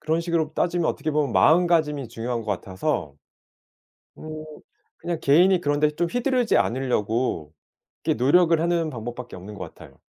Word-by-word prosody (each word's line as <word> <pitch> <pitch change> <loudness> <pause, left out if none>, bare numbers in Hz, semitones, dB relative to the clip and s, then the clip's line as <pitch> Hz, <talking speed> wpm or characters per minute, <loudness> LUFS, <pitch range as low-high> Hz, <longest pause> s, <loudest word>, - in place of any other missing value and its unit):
그런 160 +2 0
식으로 165 -3 -1
따지면 175 -1 0
어떻게 155 - -2
보면 145 -4 0
마음가짐이 160 -6 +3
중요한 120 +1 -4
것 110 - -14
같아서 95 - -3 1.0
음 155 0 -7 0.5
그냥 170 -2 -3
개인이 175 +7 +5
그런 145 -1 0
데 150 0 +4
좀 170 +3 -1
휘두르지 245 0 +1
않으려고 115 - -1 0.5
이렇게 - - +1
노력을 165 +4 +4
하는 170 -1 0
방법밖에 120 0 -7
없는 100 +4 -10
것 - - -8
같아요. - - -16
150 Hz, 360 characters per minute, -24 LUFS, 120-170 Hz, 1.0 s, 개인이